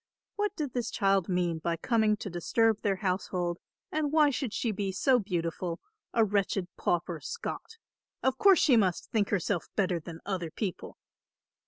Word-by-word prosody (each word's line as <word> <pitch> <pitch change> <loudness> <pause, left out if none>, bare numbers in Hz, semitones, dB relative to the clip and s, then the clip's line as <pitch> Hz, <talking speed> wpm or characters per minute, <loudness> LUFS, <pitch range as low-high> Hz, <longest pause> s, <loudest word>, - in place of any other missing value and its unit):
What 415 -1 -1
did 290 -6 -3
this 245 -2 -1
child 195 -4 +2
mean 175 -3 0
by 165 +1 -1
coming 220 +2 +2
to 200 - -6
disturb 220 +5 +1
their 200 -2 +1
household, 180 -2 -2 0.3
and 305 -2 0
why 300 -2 +5
should 265 -3 -2
she 230 +1 -1
be 195 -1 -2
so 250 +7 +3
beautiful, 175 -3 -3 0.3
a 225 -1 +4
wretched 195 -2 0
pauper 175 -1 -1
Scot? 455 - -6 0.5
Of 265 0 +1
course 395 -2 +7
she 275 -5 +5
must 190 -6 +1
think 210 -3 +1
herself 185 -2 0
better 185 -4 +1
than 165 +1 -9
other 185 -4 -2
people! 185 +3 -5
200 Hz, 165 wpm, -29 LUFS, 175-235 Hz, 0.5 s, course